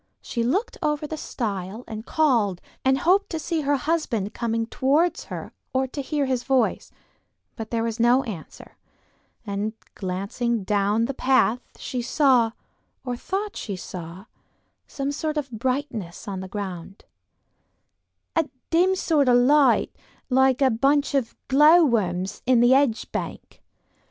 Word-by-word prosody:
She 235 - -3
looked 300 - -1
over 300 -2 0
the 315 - -4
stile 210 -6 -4
and 220 0 -7
called 235 - +2 0.2
and 265 0 +3
hoped 370 +8 +2
to 330 - -3
see 320 +1 -2
her 285 0 +1
husband 265 -8 -1
coming 230 -1 -1
towards 300 +8 +1
her - - -7 0.2
or 260 0 +2
to 280 - -4
hear 285 +1 -1
his 260 -2 0
voice; 260 -4 +1 0.7
but 220 -1 -6
there 230 -1 -1
was 230 0 -3
no 245 +3 +4
answer, 190 -9 -9 0.7
and 205 +1 -2 0.2
glancing 200 +4 -2
down 205 +3 +1
the 275 - -3
path 255 -2 +2 0.2
she 250 - -4
saw, 250 -3 +3 0.5
or 250 -1 -2
thought 400 - -4
she 200 - -4
saw, 180 +1 -8 0.6
some 275 0 -3
sort 305 +1 -3
of 275 -3 -3
brightness 230 - -3
on 195 -2 -4
the 190 - -6
ground, 195 -2 -7 1.3
"a 325 -3 +1 0.2
dim 360 +3 +4
sort 300 -7 +2
of 245 - +6
light 280 +3 +4 0.4
like 265 +1 +4
a 260 - +4
bunch 280 +5 +2
of 260 -5 0
glow 305 +5 +6
worms 195 - -1
in 245 -2 +5
a 240 - +5
hedge 265 -3 +2
bank. - - -6
250 Hz, 145 wpm, -24 LUFS, 215-285 Hz, 1.3 s, of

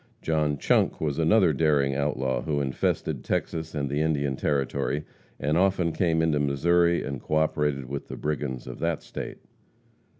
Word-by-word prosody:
John 75 -2 +1
Chunk - - +2
was 75 -1 -1
another 85 +1 +4
daring 70 -2 +2
outlaw 65 -2 -1
who 75 -2 -1
infested 65 -2 -1
Texas 80 -1 -2
and 70 -1 -1
the 70 +2 -1
Indian 70 -3 0
Territory, 70 +1 -1 0.4
and 75 +4 +1
often 95 -3 +2
came 80 0 +1
into 80 -2 +2
Missouri 85 +5 +2
and 70 -3 -5
co 75 - -2
operated 75 -3 +1
with 70 +2 -5
the - - -7
brigands 70 -4 -3
of - - -8
that 85 -1 -1
state. - - -6
75 Hz, 160 wpm, -26 LUFS, 70-80 Hz, 0.4 s, another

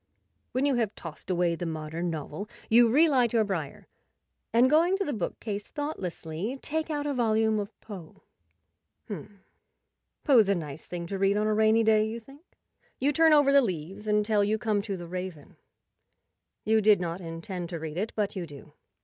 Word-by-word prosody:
When 260 +2 0
you 285 - +3
have 220 -4 -1
tossed 165 +2 -10
away 175 -2 +2
the 170 +1 -4
modern 160 +2 -3
novel 160 +5 -5 0.2
you 235 +1 +6
re 300 +8 +5
light 250 -6 +2
your 225 -2 +4
briar, 170 -9 -4 0.6
and, 240 +2 +5
going 335 +7 +4
to 395 - -1
the 295 - -2
bookcase 205 +1 -4
thoughtlessly, 200 - -4
take 315 +1 -2
out 295 -2 -2
a 290 - -1
volume 220 -3 +2
of 205 +2 -7
Poe. 190 -7 -11 0.4
" - - -53
H'm, 200 0 -9 0.8
Poe's 235 -8 +5
a 200 - +3
nice 155 -3 -6
thing 175 -1 -5
to 195 +3 -4
read 195 +1 +3
on 210 - +1
a 215 - +2
rainy 220 +1 +4
day," 215 -1 +4
you 225 +2 -5
think. 275 +6 -16 0.6
You 285 +3 +2
turn 325 +2 +5
over 290 -2 +5
the 280 - +7
leaves 190 - -4
until 210 0 +2
you 210 +2 +1
come 215 -2 0
to 200 -2 -4
"The 175 -1 -8
Raven." 180 -4 -7 1.1
You 220 0 +3
did 210 -1 +5
not 175 +1 -3
intend 170 +1 -6
to 170 - -4
read 155 -1 -6
it, 215 +3 -2
but 210 -2 -1
you 180 -3 -4
do. 145 -2 -13
210 Hz, 190 wpm, -28 LUFS, 175-235 Hz, 1.1 s, the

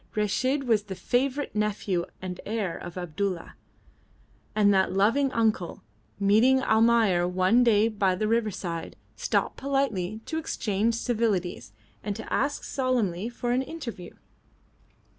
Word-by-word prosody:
Reshid 255 +7 +1
was 220 -5 +2
the 195 -2 -6
favourite 260 +5 -1
nephew 205 -4 -1 0.2
and 180 -1 -5
heir 210 -5 -2
of 175 0 -8
Abdulla, 180 +1 -3 1.0
and 205 -1 +4
that 190 -1 +3
loving 230 +9 +2
uncle, 220 -7 0 0.4
meeting 220 +7 +4
Almayer 220 -5 +3
one 185 +7 +3
day 220 -2 +4
by 200 -4 +1
the 215 +3 -1
riverside, 210 -7 -2 0.2
stopped - - -1
politely 230 -8 -1
to 320 - -2
exchange 225 -6 -1
civilities 215 - -1 0.3
and 205 -1 -3
to - - -6
ask 285 - 0
solemnly 235 -7 -1
for 240 0 -3
an 250 +2 +2
interview. 255 - -7
215 Hz, 125 wpm, -27 LUFS, 190-240 Hz, 1.0 s, and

